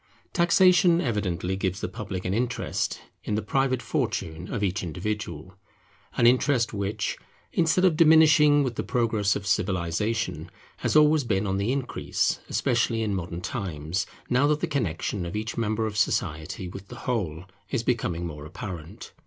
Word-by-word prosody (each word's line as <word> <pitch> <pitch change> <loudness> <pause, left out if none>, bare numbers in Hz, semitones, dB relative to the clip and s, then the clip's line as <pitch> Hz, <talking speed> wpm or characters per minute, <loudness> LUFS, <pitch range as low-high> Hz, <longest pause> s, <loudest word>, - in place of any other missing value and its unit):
Taxation 175 0 +5
evidently 95 - -1
gives 95 0 -2
the - - -2
public 100 -5 -6
an 90 - 0
interest 120 +3 -1 0.2
in 105 - -1
the 110 - 0
private 130 +2 0
fortune 85 -6 -2
of 110 -4 -2
each 95 0 0
individual; 90 -1 -4 0.6
an 120 - +4
interest 125 -1 +3
which, 100 0 -2 0.3
instead 170 +2 +3
of 175 -4 +4
diminishing 155 -2 +6
with 125 -4 -3
the - - -1
progress 110 -5 +1
of 100 - -4
civilization, 95 +3 -1 0.3
has - - -1
been 155 - +8
always 150 -5 +2
on 95 0 +1
the 100 +5 0
increase, 135 -2 -1
especially 115 -1 +1
in 105 -2 -1
modern 90 -2 -4
times, 90 - -3 0.2
now 125 +3 +3
that 150 0 +2
the - - +2
connexion 100 - -2
of 85 +4 -5
each 110 +1 -3
member 110 -1 0
of 110 -1 -4
society 90 -2 -1
with 95 +2 -9
the - - -10
whole 90 - -2 0.3
is 120 -4 -1
becoming 90 -9 -1
more 75 -3 -7
apparent. 85 -1 -8
105 Hz, 160 wpm, -26 LUFS, 90-125 Hz, 0.6 s, been